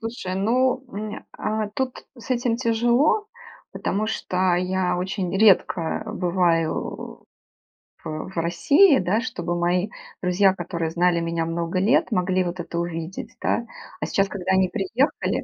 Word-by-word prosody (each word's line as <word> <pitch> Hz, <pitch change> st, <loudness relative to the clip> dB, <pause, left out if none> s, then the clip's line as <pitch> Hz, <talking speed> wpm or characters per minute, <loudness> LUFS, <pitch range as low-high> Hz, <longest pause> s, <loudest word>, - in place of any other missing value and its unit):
Слушай, 225 Hz, -5 st, -4 dB
ну, 255 Hz, +6 st, +1 dB
м, 215 Hz, -1 st, -6 dB
а, 215 Hz, -1 st, -2 dB
тут 260 Hz, +3 st, -4 dB
с 240 Hz, -, -12 dB
этим 240 Hz, -2 st, +1 dB
тяжело, 240 Hz, -, +2 dB, 0.4 s
потому 210 Hz, +2 st, -1 dB
что 185 Hz, -4 st, 0 dB
я 180 Hz, 0 st, 0 dB
очень 185 Hz, 0 st, -2 dB
редко 190 Hz, -5 st, +3 dB
бываю 175 Hz, -3 st, -1 dB, 0.8 s
в -, -, -27 dB
в 160 Hz, +4 st, -6 dB
России, 265 Hz, -, +4 dB
да, 190 Hz, +5 st, +1 dB
чтобы 175 Hz, -8 st, -3 dB
мои 180 Hz, +3 st, +1 dB, 0.3 s
друзья, 185 Hz, +1 st, +3 dB
которые 170 Hz, -3 st, -3 dB
знали 175 Hz, 0 st, +2 dB
меня 165 Hz, 0 st, -1 dB
много 170 Hz, +2 st, -2 dB
лет, 225 Hz, +4 st, +3 dB
могли 185 Hz, -1 st, +1 dB
вот 175 Hz, 0 st, -4 dB
это 170 Hz, 0 st, -5 dB
увидеть, 170 Hz, +1 st, -5 dB
да. 235 Hz, -, 0 dB, 0.4 s
А -, -, 0 dB
сейчас, 195 Hz, 0 st, +1 dB
когда 190 Hz, -2 st, -3 dB
они 190 Hz, -1 st, +3 dB
приехали 225 Hz, -, 0 dB
185 Hz, 140 wpm, -23 LUFS, 175-225 Hz, 0.8 s, России